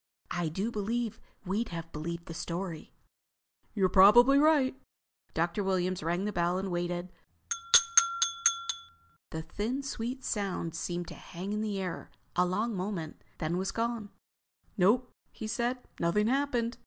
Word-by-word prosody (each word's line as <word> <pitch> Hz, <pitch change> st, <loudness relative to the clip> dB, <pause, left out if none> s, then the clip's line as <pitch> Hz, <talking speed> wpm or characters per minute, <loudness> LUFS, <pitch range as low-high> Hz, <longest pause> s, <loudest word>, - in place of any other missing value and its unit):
—I 175 Hz, -2 st, -1 dB
do 195 Hz, +8 st, -2 dB
believe 225 Hz, +1 st, -2 dB, 0.3 s
we'd 205 Hz, +5 st, -1 dB
have 165 Hz, -1 st, -6 dB
believed 170 Hz, +3 st, -5 dB
the 165 Hz, -, -7 dB
story." 170 Hz, 0 st, -5 dB, 0.8 s
"You're 195 Hz, -3 st, +3 dB
probably 240 Hz, +9 st, +7 dB
right." 295 Hz, -4 st, +4 dB, 0.6 s
Dr. 170 Hz, +5 st, 0 dB
Williams 185 Hz, -1 st, 0 dB
rang 175 Hz, +5 st, -1 dB
the 210 Hz, -, -2 dB
bell 175 Hz, 0 st, +1 dB
and 190 Hz, 0 st, -3 dB
waited. 175 Hz, +1 st, -2 dB, 2.2 s
The 160 Hz, 0 st, -5 dB
thin, 235 Hz, -, -3 dB
sweet 260 Hz, 0 st, -4 dB
sound 190 Hz, -5 st, -2 dB
seemed 175 Hz, +1 st, -3 dB
to -, -, -7 dB
hang 190 Hz, +3 st, -6 dB
in 210 Hz, -, -1 dB
the 210 Hz, -2 st, -2 dB
air 185 Hz, -3 st, -4 dB, 0.3 s
a 180 Hz, 0 st, +3 dB
long 215 Hz, +6 st, -1 dB
moment, 180 Hz, -4 st, -4 dB
then 160 Hz, +3 st, -1 dB
was 190 Hz, +1 st, -1 dB
gone. 230 Hz, -2 st, -2 dB, 0.7 s
"Nope," 230 Hz, +6 st, +3 dB, 0.2 s
he 220 Hz, -, -7 dB
said. 240 Hz, +3 st, -1 dB, 0.2 s
"Nothing 170 Hz, +5 st, +2 dB
happened. 245 Hz, -2 st, 0 dB
195 Hz, 140 wpm, -30 LUFS, 175-230 Hz, 2.2 s, probably